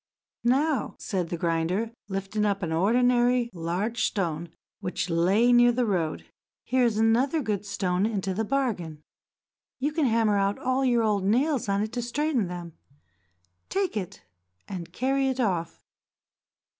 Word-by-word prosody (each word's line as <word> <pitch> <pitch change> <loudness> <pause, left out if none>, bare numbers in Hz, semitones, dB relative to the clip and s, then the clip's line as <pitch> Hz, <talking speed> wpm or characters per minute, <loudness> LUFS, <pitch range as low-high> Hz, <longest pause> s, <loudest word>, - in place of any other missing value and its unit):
"Now," 275 +4 +1
said 180 -4 -3
the 175 - -3
grinder, 170 +6 0 0.2
lifting 195 +2 -2
up 200 -2 0
an 165 - -2
ordinary 240 +6 +3
large 185 +7 -2
stone 170 -4 -2 0.3
which 180 -2 -3
lay 195 +9 +3
near 240 0 +6
on 240 - +1
the 250 -1 +2
road, 175 -7 -1 0.4
"here 255 0 +1
is 225 -3 +1
another 240 +8 +3
good 210 -6 -2
stone 190 0 0
into 195 -4 -2
the 220 +4 -1
bargain. 210 - -2 0.7
You 285 +3 -1
can 300 -2 +1
hammer 225 -3 +2
out 200 +1 +1
all 260 +1 0
your 240 -3 +3
old 210 -3 +1
nails 250 +4 +1
on 200 +1 +1
it 220 +2 -5
to 245 - -2
straighten 250 - 0
them. 175 -2 -7 1.0
Take 390 - -1
it, 200 -2 -5 0.4
and 175 -3 -6
carry 270 +2 0
it 260 0 -1
off." 175 -8 -1
215 Hz, 155 wpm, -26 LUFS, 185-245 Hz, 1.0 s, near